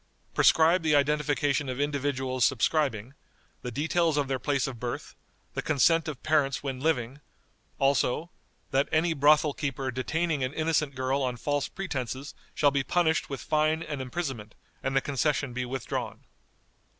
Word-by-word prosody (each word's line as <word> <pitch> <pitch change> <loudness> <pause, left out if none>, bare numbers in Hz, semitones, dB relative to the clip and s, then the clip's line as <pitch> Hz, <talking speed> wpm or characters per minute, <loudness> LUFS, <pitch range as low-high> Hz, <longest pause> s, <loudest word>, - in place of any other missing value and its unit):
Prescribe 165 +3 +5
the 155 -2 +3
identification 145 -1 +1
of 130 +1 -4
individuals 140 -3 -1
subscribing; 130 -2 +1 0.5
the 125 - -4
details 160 +5 +1
of 145 -2 +1
their 130 -1 -1
place 140 0 0
of 125 -4 -6
birth; 120 0 -5 0.4
the - - -2
consent 165 +3 +3
of 150 -5 -6
parents 145 -4 +1
when 135 -2 -3
living; 135 -2 -1 0.6
also, 140 +4 +1 0.4
"That 135 +2 +2
any 165 +1 +2
brothel 150 0 +4
keeper 135 -2 -3
detaining 155 +4 -1
an 130 +3 -3
innocent 155 -3 0
girl 130 +2 0
on 125 -2 -1
false 145 +3 -1
pretenses 140 -7 -5 0.2
shall 145 -1 +4
be 140 -1 0
punished 160 0 +1
with 135 - -5
fine 155 +1 +1
and 145 -4 -5
imprisonment, 130 -6 -5 0.3
and 135 0 -2
the 135 - +4
concession 140 -1 0
be 125 +1 -2
withdrawn." 130 0 -4
140 Hz, 150 wpm, -28 LUFS, 130-155 Hz, 0.6 s, Prescribe